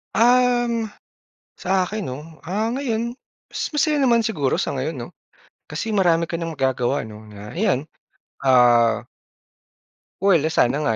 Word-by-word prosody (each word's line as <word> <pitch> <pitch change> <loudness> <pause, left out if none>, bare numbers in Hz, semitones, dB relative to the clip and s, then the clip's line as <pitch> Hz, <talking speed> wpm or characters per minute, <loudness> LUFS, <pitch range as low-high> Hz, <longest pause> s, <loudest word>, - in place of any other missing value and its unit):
Um, 240 -1 +3 0.7
sa 185 0 0
akin 215 +2 -4
'no, 130 -4 -5 0.2
ah, 200 +6 -1
ngayon 235 -3 -2 0.3
mas - - -4
masaya 300 0 +2
naman 255 -5 +4
siguro 150 - 0
sa - - -2
ngayon 140 +5 -2
'no. - - -15 0.6
Kasi 155 +9 -4
marami 170 -6 +2
ka 170 - -2
ng 165 -1 -4
magagawa 130 -1 0
'no 110 -1 -10
na, 105 0 -11
ayan. 190 -9 +2 0.6
Ah 120 -3 +4 1.2
Well, 175 -6 +4
sana 140 -3 +2
nga 130 -7 0
170 Hz, 135 wpm, -22 LUFS, -, 1.2 s, naman